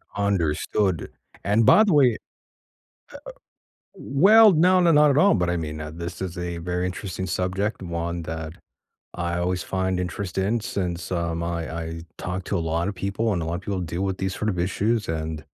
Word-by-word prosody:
Understood. 95 -1 0 0.3
And 105 +3 +2
by 215 - +7
the 200 -6 +2
way, 145 -3 +6
eh, - - -6
uh - - -7 1.8
Well, 205 +9 +6
no, 180 +3 +4
no, 170 -1 +4
not 150 0 +6
at 140 - +3
all. 195 -2 +5
But 90 -3 +1
I 90 - 0
mean, 75 -1 -5
uh, 75 0 -6
this 85 +2 -6
is 95 -1 -4
a 85 -1 -4
very 90 +1 -2
interesting 95 0 -5
subject. 95 +3 -2
One 85 -1 -3
that 80 0 -5 0.6
I 85 0 -2
always 90 0 -1
find 95 -1 -1
interest 90 +2 -4
in 105 +5 +1
since, 90 -3 -4
um, 85 -1 -2
I 85 0 -2 0.2
I 80 0 -6 0.2
talk 90 +1 -4
to 100 - -1
a - - -1
lot 85 +3 0
of 100 - -4
people 100 +4 -1
and 85 - -1
a - - -3
lot 85 +1 -2
of 90 - -5
people 95 -2 -3
deal 85 +3 -3
with 95 -1 -2
these 95 0 -2
sort 110 - -1
of 90 -3 -2
issues 105 +4 0
and 80 -1 -3
90 Hz, 200 wpm, -24 LUFS, 85-100 Hz, 1.8 s, by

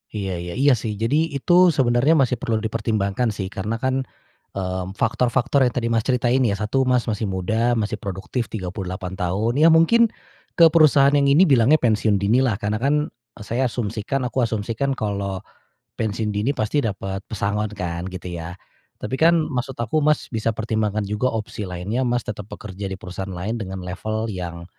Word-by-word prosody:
Iya 95 -3 -2
iya 85 0 -6
iya 140 +3 +4
sih. 110 -2 -3
Jadi 145 +9 0
itu 175 +6 +5
sebenarnya 130 +3 +3
masih 130 -5 +2
perlu 110 -2 -1
dipertimbangkan 110 0 -1
sih 100 -3 -4
karena 105 +4 -3
kan, 130 0 0 0.5
eee, 95 -1 -3
faktor-faktor 125 +5 +1
yang 125 - -3
tadi, 120 -2 0
Mas, 115 -1 0
ceritain 125 0 +2
ya 100 - 0
satu, 110 +6 0
Mas 125 -2 +3
masih 105 0 -2
muda 110 +6 0
masih 105 -1 -2
produktif, 100 +5 -4
38 95 -1 -5
tahun. 100 +6 0
Ya 160 - +7
mungkin, 165 +9 +5 0.5
ke 165 -2 +7
perusahaan 145 -4 +6
yang 140 -1 +3
ini 150 +7 +6
bilangnya 135 -2 +5
pensiun 110 -5 +2
dini 100 +5 +2
lah 125 -5 +1
karena 105 0 -2
kan 150 +3 +1 0.3
saya 120 +5 -1
asumsikan 115 +3 -3
aku 130 - -2
asumsikan 115 +5 -2
kalau, 100 -4 -3 0.6
pensiun 110 -1 -1
dini 110 +8 -1
pasti 110 +7 0
dapat 95 -4 -3
pesangon 105 0 -1
kan 85 -1 -4
gitu 90 -1 -8
ya, 85 +1 -6 0.4
tapi 130 +5 -5
kan 170 +1 +6 0.2
maksud 125 +1 -3
aku, 120 +7 0
Mas, 150 0 +1
bisa 110 -1 -1
pertimbangkan 110 -1 -1
juga 105 +5 0
opsi 105 -3 -4
lainnya 90 +7 -3
Mas 120 -1 0
tetap 105 -1 -6
bekerja 100 -2 -7
di 95 - -5
perusahaan 95 +1 -7
lain 95 +6 -4
dengan 95 -2 -6
level 110 +5 -3
yang, 85 -2 -6
110 Hz, 175 wpm, -22 LUFS, 100-130 Hz, 0.6 s, Ya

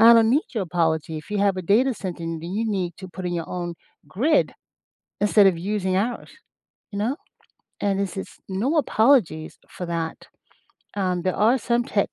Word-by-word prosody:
I 230 +1 +9
don't 225 -1 +5
need 295 - +2
your 210 -5 0
apology. 160 -1 0
If 155 - -19
you 210 - -1
have 195 -2 +2
a - - -3
data 260 +2 +3
center, 180 -5 -5 0.2
then 170 +3 -6
you 225 - 0
need 185 -5 -1
to 190 - -8
put 180 +1 -6
in 175 - -2
your 165 - -2
own 175 -1 -4 0.3
grid, 275 - +2 0.7
instead 205 -1 +6
of 190 - +2
using 190 +1 -1
ours, 235 +5 -1 0.6
you 200 - -4
know? 225 +6 0 0.7
And 200 -1 +1
this 200 -2 -3
is 195 - -4 0.2
no 225 - 0
apologies 220 - +2
for 180 - -6
that. 165 -1 -2 0.8
Um, 185 -3 0
there 185 - +1
are 230 +5 +4
some 235 +1 +1
tech 205 -6 0
195 Hz, 190 wpm, -24 LUFS, 175-225 Hz, 0.8 s, I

